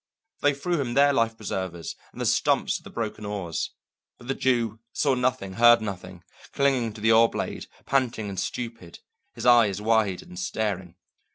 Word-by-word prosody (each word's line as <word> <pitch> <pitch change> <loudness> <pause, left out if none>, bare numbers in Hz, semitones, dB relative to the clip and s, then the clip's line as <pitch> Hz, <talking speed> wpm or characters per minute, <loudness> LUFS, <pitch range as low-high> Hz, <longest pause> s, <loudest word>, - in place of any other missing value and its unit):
They 145 -1 +3
threw 170 +2 -1
him 120 -3 -3
their 140 +1 +5
life 115 -3 +1
preservers 95 -5 -4 0.2
and - - -13
the - - -1
stumps - - +2
of - - -25
the - - -10
broken 110 -2 -4
oars. 100 -5 -3 0.5
But 120 - -13
the - - +2
Jew 115 -5 0
saw 140 -2 +2
nothing, 125 -6 -1
heard 120 +3 +7
nothing, 90 -4 -7 0.3
clinging 130 -5 +1
to 105 - -11
the 110 +1 +4
oar 115 +1 +6
blade, - - -4 0.2
panting 125 -6 0
and 95 -2 -4
stupid, 115 +3 -5 0.4
his - - -6
eyes 115 -5 +5
wide 105 -3 +1
and 90 - -10
staring. 95 -3 -3
115 Hz, 175 wpm, -26 LUFS, 100-125 Hz, 0.5 s, heard